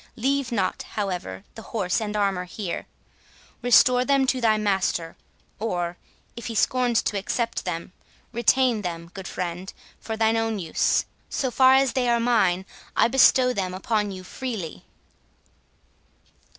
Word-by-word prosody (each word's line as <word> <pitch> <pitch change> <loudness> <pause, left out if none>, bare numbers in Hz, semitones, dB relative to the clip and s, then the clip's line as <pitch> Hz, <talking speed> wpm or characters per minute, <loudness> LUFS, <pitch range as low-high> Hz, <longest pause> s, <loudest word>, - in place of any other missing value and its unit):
Leave 275 +2 0
not, 195 -5 -1 0.2
however, 180 - -3
the 225 - -9
horse 195 -3 -1
and 210 -1 -3
armour 195 -3 0
here. 185 0 -5 0.7
Restore 250 +1 +5
them 275 0 +3
to 260 -1 0
thy 220 -2 +3
master; 190 -5 0 0.4
or, 175 -5 -2 0.4
if 235 - -7
he 230 - -5
scorns 245 +1 +2
to 205 - -1
accept 230 +4 -2
them, 170 -1 -4 0.4
retain 240 0 +2
them, 170 -2 -5
good 190 -1 -7
friend, 180 +1 -4 0.3
for 220 -1 -5
thine 225 0 +2
own 225 -1 0
use. 165 -5 +1 0.2
So 260 -3 -1
far 260 +1 +6
as 270 -1 +3
they 255 -3 +1
are 235 0 +3
mine, 195 -6 +2 0.3
I - - +4
bestow 255 0 +5
them 185 -4 -2
upon 210 +2 -1
you 185 -1 -7
freely." 210 -5 -6
215 Hz, 145 wpm, -24 LUFS, 185-245 Hz, 0.7 s, far